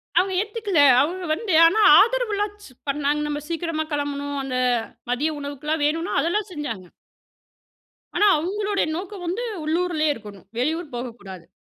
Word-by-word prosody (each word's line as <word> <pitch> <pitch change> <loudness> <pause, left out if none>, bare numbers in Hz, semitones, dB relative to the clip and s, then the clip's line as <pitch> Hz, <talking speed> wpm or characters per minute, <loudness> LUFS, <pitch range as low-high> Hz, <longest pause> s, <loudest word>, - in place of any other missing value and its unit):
அவங்க 380 +1 +3
ஏத்துக்கல. 420 -4 -1 0.2
அவங்க 355 +5 -2
வந்து 380 +3 -2
ஆனாஆதரவுலாம் 415 +3 +4 0.4
பண்ணாங்க. 290 +1 0
நம்ம 295 0 -3
சீக்கிரமா 330 -2 -2
கிளம்பணும் 285 0 -3
அந்த 260 -1 -3 0.5
மதிய 290 +6 0
உணவுக்கெல்லாம் 290 +2 -3
வேணுனா 330 +5 -1
அதெல்லாம் 400 +5 -1
செஞ்சாங்க. 230 - -5 1.3
ஆனா 415 - +4
அவங்களுடைய 400 +5 -1
நோக்கம் 375 +1 -7
வந்து 370 +8 -2 0.2
உள்ளூரிலயே 315 -1 +1
இருக்கணும். 205 -4 -12
வெளியூர் 315 +3 -2
போகக்கூடாது. 225 -8 -8
315 Hz, 120 wpm, -23 LUFS, 285-390 Hz, 1.3 s, ஆனாஆதரவுலாம்